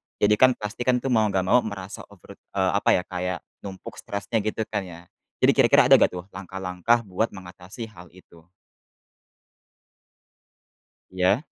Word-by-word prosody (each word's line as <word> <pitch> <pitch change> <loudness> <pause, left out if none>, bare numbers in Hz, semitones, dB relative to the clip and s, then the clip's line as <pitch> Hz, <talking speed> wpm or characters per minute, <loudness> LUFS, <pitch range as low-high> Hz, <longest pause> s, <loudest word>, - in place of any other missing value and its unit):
Jadi 105 +1 +2
kan, 130 -1 +6
pasti 105 +4 -6
kan 125 -1 +2
tuh 135 - -1
mau 110 -3 +3
nggak 95 -2 0
mau 120 +7 +4
merasa 100 -3 -7
over 100 -4 -16
eee, 95 -1 -1
apa 100 - +1
ya? 90 - 0
Kayak 90 -1 -4 0.2
numpuk 95 -2 -9
stresnya 100 +2 -3
gitu 110 +1 -2
kan 105 -1 -1
ya? 85 -2 -11 0.4
Jadi - - +6
kira-kira - - +5
ada - - +9
gak - - +3
tuh 90 -1 -7
langkah-langkah 95 +4 -1
buat 100 +4 -2
mengatasi 95 +4 -10
hal 90 -5 -14
itu? 85 -3 -19 2.7
Iya. 95 +7 +1
100 Hz, 155 wpm, -24 LUFS, 90-110 Hz, 2.7 s, ada